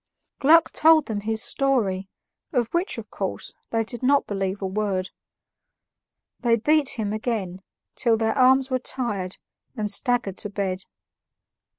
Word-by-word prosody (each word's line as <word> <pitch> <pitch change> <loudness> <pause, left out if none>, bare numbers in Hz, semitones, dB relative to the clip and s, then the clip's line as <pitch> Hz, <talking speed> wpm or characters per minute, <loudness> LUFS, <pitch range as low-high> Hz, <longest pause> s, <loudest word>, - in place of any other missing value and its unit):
Gluck 320 +4 +5
told 315 -1 +5
them 210 -2 -3
his 220 +1 0
story, 205 -9 0 0.4
of 240 -5 0
which, 345 +3 0
of - - -8
course, - - -4 0.2
they 225 0 0
did 240 +2 -7
not 275 +2 +3
believe 195 -1 -2
a 195 - -3
word. 190 -1 -2 1.3
They 235 -2 +3
beat 295 +4 +2
him 210 -2 -2
again, 215 -5 -3 0.3
till 230 -3 +2
their 220 0 0
arms 265 0 +4
were 255 - +1
tired, 210 -8 -3 0.4
and 210 -1 -1
staggered 235 -4 0
to 210 - -3
bed. 195 -2 -3
225 Hz, 145 wpm, -24 LUFS, 200-260 Hz, 1.3 s, Gluck